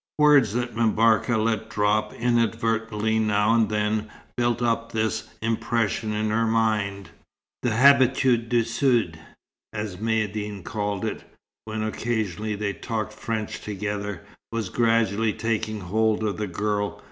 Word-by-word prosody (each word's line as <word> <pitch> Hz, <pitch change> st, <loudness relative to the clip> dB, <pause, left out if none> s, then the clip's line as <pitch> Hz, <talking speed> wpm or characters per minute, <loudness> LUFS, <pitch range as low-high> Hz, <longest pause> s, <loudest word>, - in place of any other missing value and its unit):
Words 145 Hz, -8 st, +5 dB
that 120 Hz, 0 st, -2 dB
M'Barka 115 Hz, 0 st, +3 dB
let 110 Hz, 0 st, 0 dB
drop 105 Hz, +1 st, +1 dB
inadvertently 115 Hz, -2 st, 0 dB
now 105 Hz, 0 st, +2 dB
and 115 Hz, -2 st, +3 dB
then, 105 Hz, 0 st, -1 dB, 0.3 s
built 120 Hz, -1 st, +1 dB
up 115 Hz, -1 st, 0 dB
this 110 Hz, 0 st, -1 dB
impression 115 Hz, -1 st, 0 dB
in 105 Hz, 0 st, -1 dB
her 115 Hz, +1 st, +1 dB
mind. 105 Hz, -5 st, 0 dB, 0.5 s
The 125 Hz, -, +1 dB
"habitude 130 Hz, -1 st, +4 dB
du 120 Hz, -1 st, +3 dB
Sud," 115 Hz, -, +1 dB, 0.5 s
as 105 Hz, -4 st, -5 dB
Maïeddine 105 Hz, -2 st, -2 dB
called 105 Hz, -2 st, -3 dB
it, -, -, -4 dB, 0.4 s
when 110 Hz, 0 st, -3 dB
occasionally 110 Hz, -2 st, -2 dB
they 100 Hz, -1 st, -2 dB
talked 110 Hz, 0 st, -4 dB
French 110 Hz, 0 st, -4 dB
together, 105 Hz, -2 st, -4 dB, 0.3 s
was 115 Hz, -4 st, -2 dB
gradually 115 Hz, -2 st, +2 dB
taking 110 Hz, -1 st, -2 dB
hold 110 Hz, +4 st, +1 dB
of 105 Hz, -2 st, -1 dB
the 105 Hz, -, -2 dB
girl. 105 Hz, +3 st, -2 dB
110 Hz, 130 wpm, -25 LUFS, 105-115 Hz, 0.5 s, Words